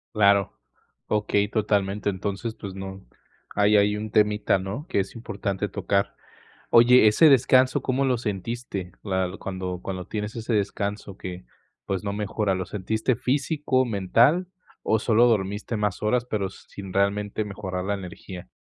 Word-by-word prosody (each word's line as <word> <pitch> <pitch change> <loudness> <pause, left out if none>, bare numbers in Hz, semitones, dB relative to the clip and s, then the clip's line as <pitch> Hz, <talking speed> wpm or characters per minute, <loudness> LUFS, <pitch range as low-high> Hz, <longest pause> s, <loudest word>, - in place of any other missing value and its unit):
Claro, 100 - +3 0.5
okey, 105 -1 +1
totalmente. 105 -2 0
Entonces, 100 +4 -4
pues 100 -2 -7
no 95 -2 -8 0.5
hay 105 +1 +4
ahí 105 0 +3
un 105 +1 -4
temita, 105 -1 +3
¿no?, 100 - -5
que - - +1
es 95 - -7
importante 100 -3 -3
tocar. 100 0 -1 0.6
Oye, 120 -1 +7
ese 155 +9 +6
descanso, 130 -1 +4
¿cómo 130 +1 0
lo 130 -2 +2
sentiste? 105 -3 -4
¿La 95 -3 -1
cuándo 95 -2 -5
cuándo 95 -2 -5
tienes 105 +1 -4
ese 115 0 -2
descanso 100 -1 -2
que, 90 -1 -7 0.4
pues, 95 -1 -2
no 100 - -2
mejora? 105 -1 -1
¿Lo 95 -1 -3
sentiste 110 +7 -1
físico, 135 +1 0
mental 120 - +3 0.4
o 110 - +2
solo 115 +1 +4
dormiste 105 0 0
más 105 -2 -2
horas, 120 +3 +1
pero 105 -5 -2
s - - -12
sin 95 -2 -9
realmente 100 +2 0
mejorar 95 -3 -5
la 100 - -1
energía? 90 -1 -8
105 Hz, 150 wpm, -25 LUFS, 95-110 Hz, 0.6 s, Oye